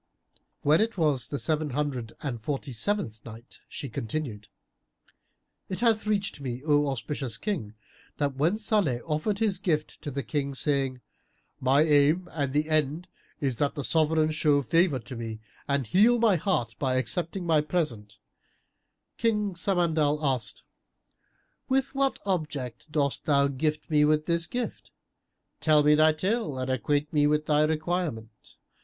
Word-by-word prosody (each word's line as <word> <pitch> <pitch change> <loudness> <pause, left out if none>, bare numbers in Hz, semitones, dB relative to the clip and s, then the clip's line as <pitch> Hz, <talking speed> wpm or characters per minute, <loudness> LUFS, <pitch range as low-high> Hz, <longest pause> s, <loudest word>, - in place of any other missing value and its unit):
When 155 +5 +4
it 225 -2 -1
was 145 - +1
the 145 - -3
Seven 155 0 +1
Hundred 130 -4 -3
and 120 -6 -4
Forty 135 +2 -4
seventh 115 - -1
Night, 115 +1 -11
She 140 - -6
continued, 115 -2 -4 1.2
It 190 +3 -4
hath 225 -3 +2
reached 200 -7 -1
me, 130 -1 -5
O 145 -1 +3
auspicious 135 -1 -3
King, 125 - -4 0.4
that 145 -2 0
when 160 +9 +1
Salih 205 - +1
offered 160 +6 -1
his 210 -4 +1
gift 160 -6 -2
to - - -5
the 140 0 -4
King, 140 -2 -2
saying, 135 -3 0 0.6
"My 135 +3 +4
aim 155 +3 +3
and 140 -2 -1
end 155 +2 0 0.3
is 135 -6 -1
that 145 +1 0
the 145 - -3
Sovran 155 +1 +2
show 150 -2 +2
favour 165 +3 +2
to 125 +3 -9
me 115 -2 -6 0.3
and 140 -2 0
heal 215 - +4
my 225 -4 +4
heart 150 - 0
by 130 -2 0
accepting 175 +7 -1
my 160 -3 +3
present," 150 - -3 1.0
King 210 -3 +1
Al - - -8
Samandal 165 -5 +1
asked, 125 -6 -1 1.1
"With 270 +1 +1
what 275 -1 +1
object 150 - -3
dost 140 -3 0
thou 140 -2 +3
gift 150 +3 -2
me 150 -1 +4
with 155 0 +2
this 170 -1 0
gift? 245 -1 -4 0.7
Tell 155 -2 +4
me 150 +1 +5
thy 155 +1 +5
tale 185 - -1
and 130 0 -2
acquaint 145 +4 -1
me 145 -1 +4
with 150 +1 +1
thy 150 0 +3
requirement. 155 -7 -3
150 Hz, 150 wpm, -27 LUFS, 135-170 Hz, 1.2 s, me